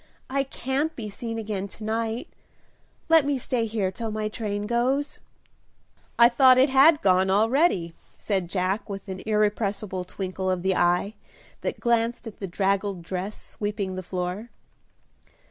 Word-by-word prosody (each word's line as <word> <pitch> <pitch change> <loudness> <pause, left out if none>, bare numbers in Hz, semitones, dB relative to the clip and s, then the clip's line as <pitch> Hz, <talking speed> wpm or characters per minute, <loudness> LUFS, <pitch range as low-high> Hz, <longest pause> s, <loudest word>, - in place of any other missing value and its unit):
"I 275 +1 +2
can't 270 +3 -2
be 215 -3 -5
seen 225 +2 -5
again 210 -3 -3
to 215 - -10
night; 225 +2 -2 0.8
let 325 -2 +6
me 285 0 0
stay 240 -2 -1
here 210 -4 -1
till 225 +3 -5
my 215 0 -2
train 210 -2 -3
goes." 260 +6 0 1.0
"I 235 - +8
thought 255 +1 +6
it 260 +2 +4
had 295 +4 +6
gone, 190 0 +3
already," 215 - +2 0.2
said 190 -5 -2
Jack, 190 +3 -1
with 200 +1 -6
an 190 -1 -6
irrepressible 210 -3 0
twinkle 185 +1 -4
of 185 -1 -1
the 190 -1 +2
eye 180 +4 +2 0.5
that - - -3
glanced 235 0 +1
at 225 - -9
the 195 - -4
draggled 195 0 -1
dress 190 +4 -4
sweeping 205 -2 -4
the 185 - -4
floor. 185 +5 -4
210 Hz, 150 wpm, -25 LUFS, 190-235 Hz, 1.0 s, I